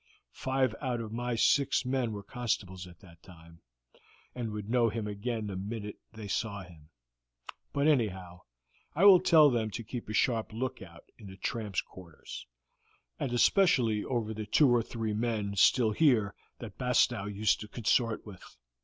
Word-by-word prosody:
Five 130 -3 0
out 125 -4 -2
of 110 -2 -6
my 120 +1 -2
six 135 +3 +2
men 125 -3 -1
were 100 -1 -6
constables 100 -6 -3
at 85 -1 -16
that 85 -4 -17
time, 85 -2 -16 0.7
and 120 -3 -4
would 105 -1 -6
know 120 0 +2
him 110 0 -4
again 105 +2 -3
the 100 -2 -5
minute 105 +2 -6
they 110 -2 -9
saw 100 -1 -3
him; 80 -4 -16 0.8
but 140 +1 +1
anyhow, 95 - 0 0.5
I 175 +6 +3
will 195 -3 +9
tell 160 -5 +6
them 115 -3 0
to 115 - -6
keep 115 0 -7
a - - -4
sharp 110 -2 0
lookout 95 -8 -6 0.2
in 105 - -11
the 95 0 -11
tramps' 105 -2 -2
quarters, 85 -4 -11 0.7
and 125 - -2
especially 120 - +3
over 115 -4 -2
the 110 -1 -6
two 140 +7 +4
or 120 -1 +4
three 115 -1 -4
men 105 -2 -2
still 110 +3 +4
here 110 -5 +3 0.2
that 110 -5 -10
Bastow 125 -4 +2
used 105 +1 +1
to 105 - -8
consort 115 +1 0
with. 100 -4 -13
110 Hz, 165 wpm, -30 LUFS, 100-125 Hz, 0.8 s, will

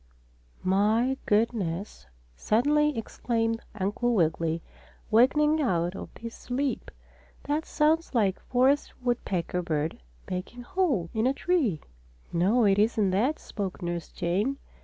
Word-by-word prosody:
"My 215 +7 +2
goodness!" 205 - 0 0.3
suddenly 290 - +2
exclaimed 225 0 -1
Uncle 215 +4 0
Wiggily, 165 -2 +1 0.5
awakening 300 +7 +4
out 175 - 0
of - - -7
his 230 0 -7
sleep. 260 0 -3 0.5
"That 295 +3 -1
sounds 315 -1 +1
like 205 -5 +3
the - - -24
forest 260 +3 +2
woodpecker 185 -8 -1
bird 160 -2 -2 0.3
making 185 +7 -5
holes 280 - 0
in 220 +2 +1
a 270 - +1
tree." 280 - +1 0.5
"No, 205 +8 +3
it 200 0 +4
isn't 210 -2 +2
that," 245 +11 +1
spoke 195 -2 -5
Nurse 170 -1 -3
Jane. 200 +10 -1
225 Hz, 120 wpm, -27 LUFS, 185-260 Hz, 0.5 s, awakening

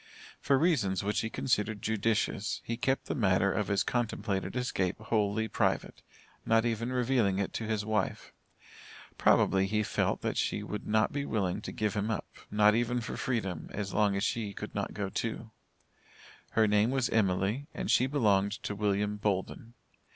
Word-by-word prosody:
For 140 - +3
reasons 115 - +1
which 105 +1 0
he 115 - -3
considered 110 -3 0
judicious, 110 -1 0
he 115 - -3
kept 130 +3 0
the - - -2
matter 100 -4 +2
of 105 - -1
his 100 -1 +1
contemplated 110 -5 -2
escape 100 -8 -1
wholly 110 0 0
private, - - -1 0.4
not 115 +1 +3
even 115 +1 -1
revealing 125 -6 +2
it 100 -1 -2
to 110 - -3
his 110 -2 -1
wife. 110 -3 -2 0.9
Probably 95 0 +4
he 105 +2 +1
felt - - 0
that - - -2
she - - 0
would 105 - -5
not 110 -1 +2
be 140 0 -1
willing 105 -6 -1
to - - -6
give 105 -1 -1
him 105 0 -1
up, 110 - -2 0.2
not 105 0 +5
even 120 +2 +1
for 120 - -5
freedom, 95 - -2
as 100 -2 -4
long 105 -1 +2
as 100 - -1
she 105 -3 -1
could - - -7
not - - -3
go 100 -2 -2
too. 115 +1 -4 1.0
Her 110 - +4
name 105 +2 +3
was 130 -2 +1
Emily, 105 +5 +1
and - - -2
she 130 - +4
belonged 105 -8 +2
to - - -2
William 105 0 0
Bolden. 105 +3 -2
105 Hz, 175 wpm, -30 LUFS, 100-115 Hz, 1.0 s, not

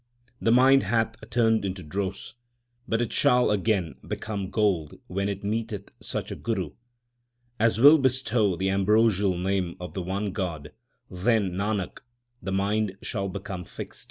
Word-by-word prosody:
The 115 - +3
mind 135 +3 +6
hath 115 +1 0 0.2
turned 115 -3 +2
into 95 -1 -4
dross, 95 +4 -4 0.5
but 115 +1 +1
it 115 - -5
shall 125 -2 +4
again 100 -4 0
become 100 -4 -4
gold 95 -9 0
when 100 +2 -2
it 100 0 -5
meeteth 105 -1 -3
such - - -4
a - - -3
Guru 95 -9 -3 0.9
As 115 0 +2
will 145 +5 +8
bestow 125 -7 +2
the 95 +3 0
ambrosial 100 -1 +3
name 90 -1 -1
of 90 0 -7
the 95 - -3
one 95 +3 -2
God; 85 -7 -4 0.4
then, 100 +1 +1
Nanak, 100 +1 -2 0.4
the 95 - -4
mind 100 +1 0
shall 100 -1 -2
become 95 -1 -6
fixed. - - -7
100 Hz, 150 wpm, -26 LUFS, 95-110 Hz, 0.9 s, will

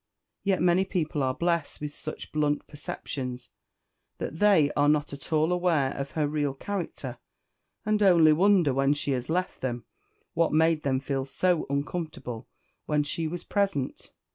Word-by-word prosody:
Yet 195 -3 +1
many 180 +1 +4
people 165 -6 -2
are 130 -1 0
blessed 170 -3 -1
with 150 0 -5
such 155 - -7
blunt 150 -1 0
perceptions 130 -4 -6 0.7
that 160 - -5
they 195 -9 +5
are 145 0 +4
not 150 -1 +1
at 140 +3 -9
all 155 +2 +3
aware 170 -7 +2
of 140 0 -5
her 150 -2 +2
real 145 -2 -1
character, 145 -9 -5 0.7
and 215 0 +1
only 170 -6 +6
wonder, 180 -4 +4
when 135 +2 +2
she 145 -1 -1
has 125 0 -2
left 180 +3 -1
them, 120 -3 -3 0.5
what 165 -1 +1
made 160 0 +3
them 130 -2 0
feel 135 -1 -2
so 175 +5 0
uncomfortable 140 -5 -4 0.4
when 150 -1 +2
she 160 +2 -2
was 175 +2 -5
present. 195 -10 -1
150 Hz, 160 wpm, -27 LUFS, 140-175 Hz, 0.7 s, only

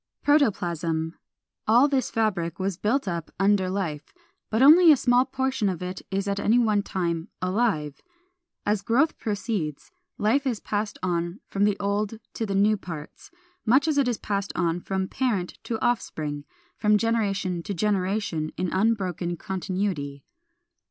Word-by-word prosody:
396. 290 -7 +4
=Protoplasm.= 165 -1 -2 0.5
All 240 +6 +6
this 270 -3 0
fabric 185 -7 -1
was 190 -1 -1
built 215 +7 0
up 170 -3 -3
under 195 -1 +3
life, 170 -6 -3 0.4
but 220 +4 +2
only 325 +4 +9
a 295 - +6
small 245 +1 +3
portion 265 -6 -1
of 180 -1 -4
it 180 +1 -5
is 195 +1 -2
at 200 0 -1
any 220 +4 +3
one 215 -4 +3
time 170 -3 -2
alive. 185 -7 0 0.6
As 205 -1 +1
growth 270 +9 +2
proceeds, 205 - -3 0.3
life 265 +7 +2
is 235 -5 -1
passed 205 0 -3
on 175 +1 -1
from 200 +1 0
the 205 -1 +1
old 205 +2 -1 0.2
to 225 - -3
the 195 - -2
new 210 +2 +4
parts, 165 -6 -9 0.3
much 265 +7 +4
as 300 -2 +2
it 275 - +2
has 240 -3 0
passed 200 -1 -2
on 170 0 0
from 190 +1 -2
parent 210 -9 -2
to 225 - -2
offspring, 150 -11 -2 0.3
from 210 -1 +4
generation 200 -5 0
to 200 - -4
generation 190 -4 0
in 180 -1 -1
unbroken 185 -4 0
continuity. 185 -7 -3
200 Hz, 155 wpm, -25 LUFS, 175-225 Hz, 0.6 s, only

